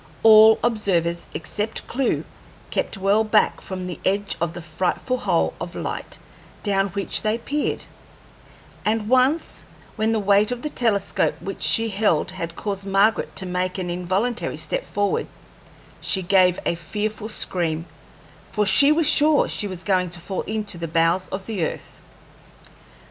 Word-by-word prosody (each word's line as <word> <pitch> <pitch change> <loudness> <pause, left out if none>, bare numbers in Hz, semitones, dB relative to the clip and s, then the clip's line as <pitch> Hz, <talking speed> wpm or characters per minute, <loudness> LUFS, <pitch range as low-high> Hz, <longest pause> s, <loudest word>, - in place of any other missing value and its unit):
All 220 0 +8
observers 180 -7 0
except 210 +8 -3
Clewe 265 +1 -1 0.5
kept - - -2
well 200 +3 +3
back 215 - +2
from 185 -1 -6
the 180 -1 -6
edge 200 +1 0
of 170 -1 -1
the 175 - -7
frightful 185 +10 -2
hole - - +1
of - - -6
light - - -5 0.5
down 195 -2 +1
which 195 +1 -1
they 215 +1 0
peered; 285 +5 -2 1.0
and 215 0 0
once, 260 +6 +2 0.3
when 220 +1 +1
the 225 - +1
weight 205 +1 +3
of 245 -1 -4
the 300 - -3
telescope 210 -5 0
which 195 - -7
she 225 0 +4
held 200 -6 +1
had 170 0 -5
caused 200 0 -4
Margaret 200 +3 +2
to 190 0 -2
make 180 +1 -2
an 180 -2 -3
involuntary 190 +7 -1
step - - -3
forward, 205 0 -1 0.7
she 190 - 0
gave 180 -1 +4
a - - +2
fearful 210 +6 -4
scream, 165 -6 -2 0.7
for 210 -1 +1
she 280 +9 +5
was 310 0 +3
sure 300 0 +5
she 210 - -2
was 185 -2 -7
going 185 -3 +1
to 175 +1 -9
fall 185 +2 -4
into 210 -4 -4
the 165 - -3
bowels 165 +3 +1
of 190 0 -5
the 210 -7 -2
earth. - - -6
200 Hz, 155 wpm, -23 LUFS, 180-220 Hz, 1.0 s, All